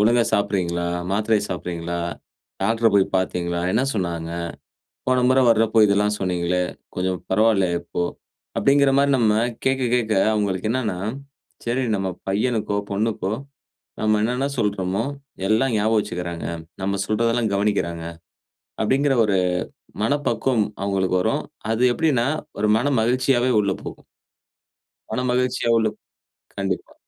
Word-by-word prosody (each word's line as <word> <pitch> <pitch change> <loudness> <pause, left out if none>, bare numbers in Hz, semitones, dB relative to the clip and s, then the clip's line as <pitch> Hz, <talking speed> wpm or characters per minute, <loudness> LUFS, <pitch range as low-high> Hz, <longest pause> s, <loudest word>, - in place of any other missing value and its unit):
ஒழுங்கா 115 +2 +4
சாப்ட்றீங்களா? 85 -4 0 0.2
மாத்திரை 110 +1 +2
சாப்ட்றீங்களா? 85 -1 -4 0.6
டாக்டர 115 0 +2
போய் 100 - +6
பாத்தீங்களா? 85 -2 -1
என்ன 120 +4 +2
சொன்னாங்க? 85 -4 -2 0.8
போன 130 -1 +3
முறை 130 0 +4
வர்றப்ப 115 0 +4
இதெல்லாம் 105 +1 +2
சொன்னீங்களே, 90 -1 0 0.3
கொஞ்சம் 90 0 -1
பரவால்லையா 95 -4 +3
இப்போ.” 85 0 -3 0.5
அப்படிங்குற 140 0 +4
மாரி 140 0 +3
நம்ம 110 -3 +3 0.3
கேக்க 130 0 +1
கேக்க, 115 -3 +1 0.2
அவுங்களுக்கு 100 0 0
என்னான்னா 110 -8 -1 0.7
சரி, 120 +3 0
நம்ம 95 -1 -1 0.2
பையனுக்கோ, 105 +1 0
பொண்ணுக்கோ 105 -1 -1 0.7
நாம 110 0 +2
என்னான்னா 125 +5 0
சொல்றோமோ 100 -1 0 0.5
எல்லாம் 115 +2 +2
ஞாபகம் 110 +1 +2
வசிக்குறாங்க, 85 -2 -5 0.4
நம்ம 100 0 -1
சொல்றதெல்லாம் 115 +1 +1
கவனிக்கிறாங்க. 100 -5 0 0.8
அபப்டிங்குற 135 +5 +2
ஒரு 100 -3 +2 0.7
மனப்பக்குவம் 130 -2 +1 0.2
அவுங்களுக்கு 95 -2 +1
வரும். - - 0 0.3
அது 120 +3 +1
எப்படின்னா 145 -8 +2 0.3
ஒரு 105 - +2
மன 130 +5 0
மகிழ்ச்சியாவே 125 +2 +2
உள்ள 100 -1 0
போகும். - - -9 1.1
மனமகிழ்ச்சியா 125 -1 0
உள்ள 110 -1 +2 0.7
கண்டிப்பா. 95 -2 -3
105 Hz, 115 wpm, -22 LUFS, 95-120 Hz, 1.1 s, போய்